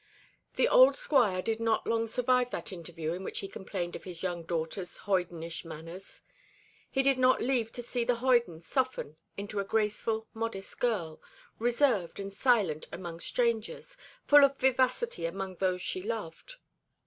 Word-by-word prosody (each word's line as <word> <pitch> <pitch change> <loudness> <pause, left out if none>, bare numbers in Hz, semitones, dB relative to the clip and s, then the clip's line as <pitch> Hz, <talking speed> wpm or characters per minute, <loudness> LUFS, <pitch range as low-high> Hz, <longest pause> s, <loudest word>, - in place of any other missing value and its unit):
The 485 - +3
old - - +7
Squire 245 - +2
did 225 0 -1
not 225 -1 +1
long 230 0 +1
survive 250 +2 +2
that - - -5
interview 165 -3 -5
in 185 +2 -5
which - - -5
he 195 - -5
complained 185 -2 -5
of - - -8
his 180 -2 -8
young 175 -2 -2
daughter's 170 +2 -3
hoydenish 175 -4 -2
manners. 165 +3 -9 0.7
He 270 - +1
did 270 -1 +3
not 255 0 +5
live 240 -3 0
to 245 - -5
see 240 0 -1
the 245 +1 +2
hoyden 235 -9 +2
soften 255 - -2 0.2
into 200 +1 -4
a - - +1
graceful, 220 +2 -1
modest 225 -4 -4
girl, 185 -10 -1 0.4
reserved 240 -7 +2
and 195 0 -5
silent 205 - +2
among 170 -2 -6
strangers, 235 - -1 0.3
full 290 0 +8
of 275 0 +4
vivacity 260 - +1
among 190 +1 -5
those 185 -1 0
she 185 - -2
loved. 220 - -5
210 Hz, 160 wpm, -30 LUFS, 180-245 Hz, 0.7 s, full